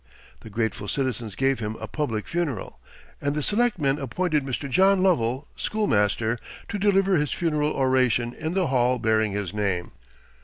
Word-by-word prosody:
The 110 Hz, -, -11 dB
grateful 110 Hz, -1 st, -2 dB
citizens 120 Hz, -4 st, -2 dB
gave 135 Hz, +1 st, +1 dB
him 110 Hz, 0 st, -3 dB
a -, -, -5 dB
public 115 Hz, -9 st, -2 dB
funeral, 165 Hz, -, -3 dB, 0.4 s
and 145 Hz, 0 st, 0 dB
the 150 Hz, -, -1 dB
Selectmen 185 Hz, -, +1 dB
appointed 150 Hz, +3 st, 0 dB
Mr. 135 Hz, +1 st, -3 dB
John 190 Hz, +6 st, +4 dB
Lovell, 135 Hz, -6 st, +1 dB
schoolmaster, 115 Hz, -, 0 dB, 0.3 s
to 205 Hz, -, -3 dB
deliver 195 Hz, -2 st, +3 dB
his 150 Hz, -1 st, 0 dB
funeral 150 Hz, -3 st, 0 dB
oration 130 Hz, -3 st, +2 dB
in 160 Hz, +5 st, -4 dB
the 190 Hz, -2 st, +2 dB
Hall 125 Hz, -2 st, +2 dB
bearing 110 Hz, -2 st, +1 dB
his 100 Hz, -2 st, -3 dB
name. 100 Hz, -4 st, -1 dB
135 Hz, 155 wpm, -25 LUFS, 110-165 Hz, 0.4 s, John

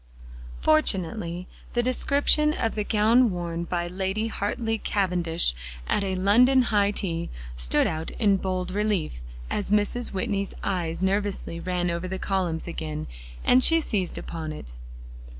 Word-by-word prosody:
Fortunately 170 Hz, -, +1 dB, 0.3 s
the 240 Hz, -, +2 dB
description 285 Hz, +4 st, +3 dB
of 225 Hz, -, -1 dB
the 210 Hz, -, -1 dB
gown 225 Hz, +4 st, +4 dB
worn 170 Hz, -2 st, -3 dB
by 175 Hz, 0 st, -2 dB
Lady 190 Hz, +5 st, -2 dB
Hartly 225 Hz, +2 st, -2 dB
Cavendish 175 Hz, -, 0 dB, 0.3 s
at 205 Hz, -, 0 dB
a 190 Hz, -1 st, -1 dB
London 245 Hz, +8 st, +5 dB
high 205 Hz, -4 st, +2 dB
tea, 170 Hz, -5 st, -3 dB, 0.3 s
stood -, -, +2 dB
out 160 Hz, 0 st, -2 dB
in 200 Hz, -3 st, +3 dB
bold 185 Hz, -1 st, -2 dB
relief, 200 Hz, -, -1 dB, 0.3 s
as 205 Hz, -, +2 dB
Mrs. 210 Hz, +4 st, +1 dB
Whitney's 200 Hz, 0 st, -2 dB
eyes 175 Hz, -2 st, -2 dB
nervously 195 Hz, -3 st, -1 dB
ran 180 Hz, 0 st, -1 dB
over 170 Hz, +2 st, -3 dB
the 190 Hz, +1 st, -3 dB
columns 185 Hz, -5 st, -1 dB
again, 155 Hz, -3 st, -4 dB, 0.4 s
and 255 Hz, +1 st, +5 dB
she 330 Hz, 0 st, +6 dB
seized 200 Hz, -, -2 dB
upon 160 Hz, -2 st, -5 dB
it. 65 Hz, -, -9 dB
190 Hz, 140 wpm, -26 LUFS, 170-215 Hz, 0.4 s, she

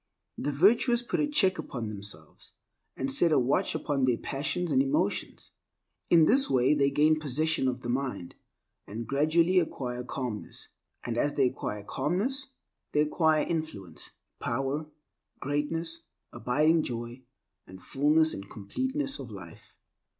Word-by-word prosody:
The 145 Hz, -, -2 dB
virtuous 235 Hz, -, +4 dB
put 240 Hz, -, -2 dB
a 295 Hz, -, +2 dB
check 195 Hz, -, +3 dB
upon 120 Hz, -4 st, -5 dB
themselves, 100 Hz, -7 st, -9 dB, 0.4 s
and 135 Hz, 0 st, -1 dB
set 165 Hz, +4 st, +4 dB
a -, -, +4 dB
watch 130 Hz, +2 st, +1 dB
upon 140 Hz, -3 st, 0 dB
their 125 Hz, -2 st, +2 dB
passions 160 Hz, +5 st, -2 dB
and 135 Hz, -1 st, +4 dB
emotions. 135 Hz, 0 st, -1 dB, 0.6 s
In 165 Hz, -2 st, +6 dB
this 270 Hz, -, +4 dB
way 130 Hz, +2 st, +3 dB
they 140 Hz, -2 st, +3 dB
gain 155 Hz, +2 st, +3 dB
possession 155 Hz, 0 st, 0 dB
of 125 Hz, 0 st, -2 dB
the 120 Hz, -, -5 dB
mind, 125 Hz, -8 st, -3 dB, 0.5 s
and 115 Hz, +3 st, -5 dB
gradually 160 Hz, -, +3 dB
acquire 125 Hz, -7 st, -3 dB
calmness. 125 Hz, -4 st, -6 dB, 0.4 s
And 120 Hz, -1 st, -2 dB
as 145 Hz, +2 st, 0 dB
they 135 Hz, -, +3 dB
acquire 105 Hz, -4 st, -5 dB
calmness, 200 Hz, -, -1 dB, 0.5 s
they 150 Hz, -, +3 dB
acquire 155 Hz, 0 st, +2 dB
influence, 155 Hz, -, -5 dB, 0.3 s
power, 135 Hz, +5 st, -2 dB, 0.5 s
greatness, 165 Hz, +4 st, -2 dB, 0.3 s
abiding 155 Hz, +6 st, +2 dB
joy, 120 Hz, -1 st, -5 dB, 0.5 s
and 95 Hz, 0 st, -11 dB
fullness 150 Hz, +7 st, +2 dB
and 100 Hz, +1 st, -8 dB
completeness 260 Hz, -, -3 dB
of 130 Hz, -, -7 dB
life. 95 Hz, -6 st, -11 dB
145 Hz, 140 wpm, -28 LUFS, 125-165 Hz, 0.6 s, In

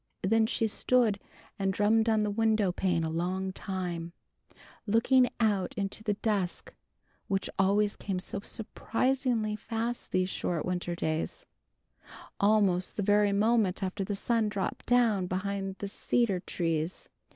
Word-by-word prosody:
Then 220 Hz, +3 st, +3 dB
she 225 Hz, -1 st, 0 dB
stood 220 Hz, -1 st, +2 dB, 0.4 s
and 195 Hz, -1 st, +1 dB
drummed 220 Hz, +3 st, +3 dB
on 220 Hz, -1 st, +3 dB
the 210 Hz, -, 0 dB
window 215 Hz, -2 st, +2 dB
pane 175 Hz, -2 st, 0 dB
a 160 Hz, -, -1 dB
long 185 Hz, +3 st, -2 dB
time, 175 Hz, -4 st, -4 dB, 0.7 s
looking 245 Hz, +4 st, +4 dB
out 205 Hz, -5 st, +1 dB
into 200 Hz, +1 st, -3 dB
the 210 Hz, -2 st, 0 dB
dusk 200 Hz, -4 st, -2 dB, 0.5 s
which 195 Hz, -1 st, -1 dB
always 205 Hz, +2 st, +3 dB
came 195 Hz, -2 st, -3 dB
so 190 Hz, +2 st, -4 dB
surprisingly 230 Hz, +1 st, -1 dB
fast 230 Hz, +2 st, -4 dB
these 185 Hz, 0 st, +2 dB
short 170 Hz, -4 st, -2 dB
winter 175 Hz, -1 st, -2 dB
days, 160 Hz, -, -3 dB, 0.9 s
almost 200 Hz, -3 st, +2 dB
the 205 Hz, -, -1 dB
very 205 Hz, 0 st, +4 dB
moment 205 Hz, -2 st, +2 dB
after 195 Hz, +1 st, -2 dB
the 205 Hz, +1 st, -3 dB
sun 225 Hz, +1 st, +1 dB
dropped 200 Hz, -2 st, -4 dB
down 225 Hz, -7 st, +3 dB
behind 195 Hz, +1 st, -3 dB
the 200 Hz, -, -4 dB
cedar 205 Hz, -1 st, 0 dB
trees. 165 Hz, -1 st, -2 dB
200 Hz, 140 wpm, -29 LUFS, 185-220 Hz, 0.9 s, looking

